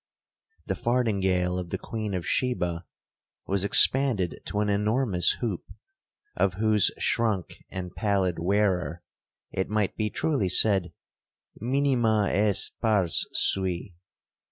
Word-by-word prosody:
The -, -, -2 dB
fardingale 95 Hz, -7 st, 0 dB
of 90 Hz, -2 st, -6 dB
the -, -, -3 dB
queen 110 Hz, -3 st, -5 dB
of 90 Hz, -, -4 dB
Sheba 90 Hz, -9 st, -1 dB, 0.6 s
was 100 Hz, 0 st, -1 dB
expanded 105 Hz, -3 st, +4 dB
to 105 Hz, -, -3 dB
an 105 Hz, -, 0 dB
enormous 105 Hz, -1 st, +1 dB
hoop, 110 Hz, -8 st, -3 dB, 0.7 s
of 90 Hz, -, +1 dB
whose 105 Hz, -1 st, +3 dB
shrunk 110 Hz, -6 st, -1 dB
and 90 Hz, -1 st, -6 dB
pallid 95 Hz, -5 st, 0 dB
wearer 90 Hz, -2 st, 0 dB, 0.5 s
it 95 Hz, -, -3 dB
might 105 Hz, -2 st, -1 dB
be 110 Hz, -1 st, -1 dB
truly 120 Hz, -7 st, -1 dB
said, 95 Hz, -2 st, +3 dB, 0.7 s
'Minima 120 Hz, -4 st, +1 dB
est 105 Hz, -1 st, 0 dB
pars 100 Hz, -7 st, +1 dB
sui. 95 Hz, -1 st, 0 dB
100 Hz, 115 wpm, -26 LUFS, 90-110 Hz, 0.7 s, expanded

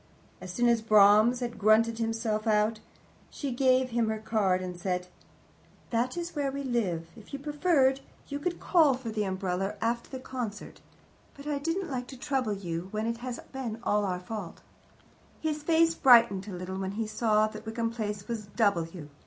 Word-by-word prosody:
As 185 Hz, -, -7 dB
soon 240 Hz, +6 st, +1 dB
as 235 Hz, -1 st, +3 dB
Brahms 215 Hz, +3 st, +5 dB
had 240 Hz, -1 st, -4 dB
grunted 225 Hz, +2 st, +4 dB
himself 225 Hz, -1 st, -1 dB
out, 215 Hz, +1 st, +2 dB, 0.5 s
she 280 Hz, -3 st, -4 dB
gave 255 Hz, 0 st, +2 dB
him 230 Hz, -1 st, +1 dB
her 220 Hz, -, -1 dB
card 215 Hz, -4 st, +1 dB
and 180 Hz, -1 st, -5 dB
said, 180 Hz, -1 st, -2 dB, 0.9 s
"That 245 Hz, +5 st, 0 dB
is 345 Hz, 0 st, -4 dB
where 280 Hz, -2 st, 0 dB
we 280 Hz, +1 st, -4 dB
live; 190 Hz, -11 st, -1 dB
if 220 Hz, +2 st, -15 dB
you -, -, -2 dB
preferred, 285 Hz, -2 st, +2 dB, 0.3 s
you 285 Hz, 0 st, -4 dB
could 350 Hz, +3 st, -2 dB
call 315 Hz, -7 st, +4 dB
for 250 Hz, -3 st, -6 dB
the 210 Hz, -1 st, -1 dB
umbrella 190 Hz, 0 st, -2 dB
after 235 Hz, +1 st, -1 dB
the 260 Hz, -, -6 dB
concert, 245 Hz, -5 st, -6 dB, 0.5 s
but 280 Hz, -, -12 dB
I 295 Hz, -1 st, -1 dB
didn't 330 Hz, +3 st, -2 dB
like 250 Hz, -1 st, -3 dB
to 265 Hz, -, -10 dB
trouble 255 Hz, -4 st, -1 dB
you 175 Hz, -3 st, -4 dB
when 215 Hz, +2 st, -2 dB
it 230 Hz, 0 st, -1 dB
has 245 Hz, 0 st, -5 dB
all -, -, -12 dB
been 240 Hz, -5 st, -5 dB
our 200 Hz, -5 st, +1 dB
fault." 185 Hz, -1 st, -7 dB, 0.8 s
His 305 Hz, -1 st, -2 dB
face 330 Hz, +1 st, +3 dB
brightened 235 Hz, -, +5 dB
a -, -, -6 dB
little 185 Hz, +1 st, -5 dB
when 190 Hz, 0 st, -3 dB
he 225 Hz, +2 st, -2 dB
saw 215 Hz, 0 st, +2 dB
that 215 Hz, 0 st, -9 dB
Wickham 230 Hz, +1 st, -2 dB
Place 210 Hz, -3 st, -4 dB
was 220 Hz, -3 st, -4 dB
W. 170 Hz, -7 st, 0 dB
225 Hz, 185 wpm, -29 LUFS, 205-260 Hz, 0.9 s, Brahms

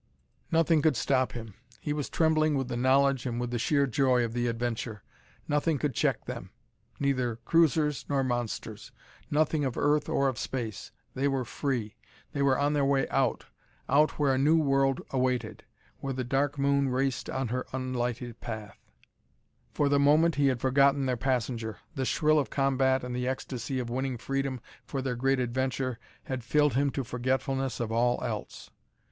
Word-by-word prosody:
Nothing 165 Hz, -1 st, +3 dB
could 155 Hz, -2 st, +3 dB
stop 130 Hz, -1 st, +1 dB
him! 115 Hz, -3 st, -7 dB, 0.3 s
He 150 Hz, -, -2 dB
was 150 Hz, -2 st, -3 dB
trembling 155 Hz, -2 st, +2 dB
with 135 Hz, -2 st, -2 dB
the -, -, -2 dB
knowledge, 135 Hz, +1 st, +3 dB
and 120 Hz, -1 st, -2 dB
with 120 Hz, 0 st, -3 dB
the 120 Hz, -, -1 dB
sheer 140 Hz, +4 st, +2 dB
joy 130 Hz, -2 st, +2 dB
of 115 Hz, -, -5 dB
the 120 Hz, 0 st, 0 dB
adventure. 115 Hz, -2 st, -3 dB, 0.4 s
Nothing 150 Hz, +1 st, +1 dB
could 145 Hz, 0 st, -1 dB
check -, -, 0 dB
them; -, -, -6 dB, 0.5 s
neither 130 Hz, -4 st, 0 dB
cruisers 150 Hz, +3 st, +2 dB
nor 140 Hz, -2 st, +1 dB
monsters; 120 Hz, -3 st, -3 dB, 0.4 s
nothing 155 Hz, 0 st, +1 dB
of 130 Hz, -3 st, -2 dB
earth 150 Hz, +1 st, +2 dB
or 140 Hz, -4 st, +2 dB
of 130 Hz, -4 st, -2 dB
space. 110 Hz, -5 st, -4 dB, 0.2 s
They 135 Hz, +2 st, 0 dB
were 135 Hz, -2 st, 0 dB
free; 120 Hz, -4 st, -3 dB, 0.3 s
they 140 Hz, -, -2 dB
were 135 Hz, -2 st, +3 dB
on 145 Hz, +1 st, +1 dB
their 145 Hz, -1 st, +2 dB
way 135 Hz, -1 st, +2 dB
out 130 Hz, -4 st, 0 dB, 0.4 s
out 150 Hz, +3 st, +3 dB
where 140 Hz, -3 st, +2 dB
a 130 Hz, -, +1 dB
new 155 Hz, +4 st, +4 dB
world 135 Hz, -3 st, +2 dB
awaited 130 Hz, -1 st, -1 dB, 0.3 s
where 135 Hz, -1 st, -3 dB
the 130 Hz, 0 st, -2 dB
Dark 135 Hz, +4 st, 0 dB
Moon 140 Hz, 0 st, +2 dB
raced 130 Hz, 0 st, -1 dB
on 130 Hz, -3 st, -2 dB
her 125 Hz, +2 st, -2 dB
unlighted 125 Hz, -2 st, -3 dB
path! 110 Hz, -4 st, -7 dB, 0.9 s
For 145 Hz, -, +1 dB
the 140 Hz, 0 st, +3 dB
moment 155 Hz, +4 st, +4 dB
he 140 Hz, -1 st, +2 dB
had 130 Hz, -3 st, +1 dB
forgotten 140 Hz, +1 st, +3 dB
their 130 Hz, -1 st, +1 dB
passenger. 115 Hz, -3 st, -2 dB, 0.2 s
The 130 Hz, -, -2 dB
thrill 155 Hz, 0 st, +3 dB
of 140 Hz, -, -1 dB
combat 135 Hz, -1 st, +2 dB
and 125 Hz, 0 st, -4 dB
the 125 Hz, 0 st, -2 dB
ecstasy 130 Hz, 0 st, -3 dB
of 120 Hz, -2 st, -3 dB
winning 130 Hz, 0 st, -2 dB
freedom 135 Hz, 0 st, -2 dB, 0.2 s
for 135 Hz, -2 st, -4 dB
their 130 Hz, -2 st, -1 dB
great 135 Hz, +2 st, +1 dB
adventure 130 Hz, 0 st, -1 dB, 0.2 s
had 130 Hz, -2 st, -4 dB
filled 150 Hz, +4 st, +2 dB
him 140 Hz, +3 st, +2 dB
to 135 Hz, 0 st, -3 dB
forgetfulness 130 Hz, +2 st, -1 dB
of 115 Hz, -2 st, -2 dB
all 120 Hz, +2 st, +1 dB
else. -, -, -5 dB
130 Hz, 175 wpm, -29 LUFS, 125-140 Hz, 0.9 s, new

